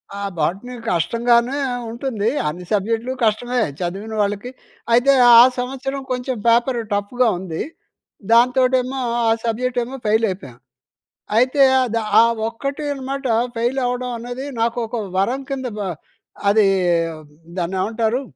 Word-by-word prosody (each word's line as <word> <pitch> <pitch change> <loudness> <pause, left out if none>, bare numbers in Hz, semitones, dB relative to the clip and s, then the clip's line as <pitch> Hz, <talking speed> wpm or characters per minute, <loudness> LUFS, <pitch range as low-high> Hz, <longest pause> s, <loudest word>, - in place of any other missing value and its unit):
ఆ - - -6 0.2
బాటని 195 +11 -2 0.2
కష్టంగానే 235 - +2 0.3
ఉంటుంది. 235 -3 -2 0.2
అన్ని 175 +4 -5
సబ్జెక్ట్‌లు 225 +5 0
కష్టమే 240 +3 +1 0.2
చదివిన 195 +5 -4
వాళ్ళకి. 205 +4 -2 0.4
అయితే 260 +4 +5 0.2
ఆ - - +11 0.2
సంవత్సరం 270 +2 -4
కొంచెం 250 0 -2
పేపర్ 235 +1 +3
టఫ్‌గా 230 +5 +1
ఉంది. 170 -3 -4 0.7
దాంతోటేమో 255 +2 +3 0.3
ఆ - - +4 0.2
సబ్జెక్ట్ 245 +2 -1
ఏమో 260 +3 -7
ఫెయిల్ 220 +2 +3
అయిపోయా. 140 -10 -7 0.8
అయితే 255 +4 +3 0.2
అది 230 -1 -1 0.2
ఆ - - +9 0.3
ఒక్కటే 275 +5 -5
అనమాట 275 0 -5 0.3
ఫెయిల్ 240 +4 0
అవ్వడం 250 0 -2
అనేది 245 +3 -6
నాకు 230 +1 0
ఒక 235 - -4 0.2
వరం 240 +8 0
కింద 265 -2 -3
బ - - -5 0.7
అది 210 0 +4 0.9
దాన్ని 180 +2 -2
ఏమంటారు? 225 +4 0
240 Hz, 125 wpm, -20 LUFS, 215-255 Hz, 0.9 s, ఆ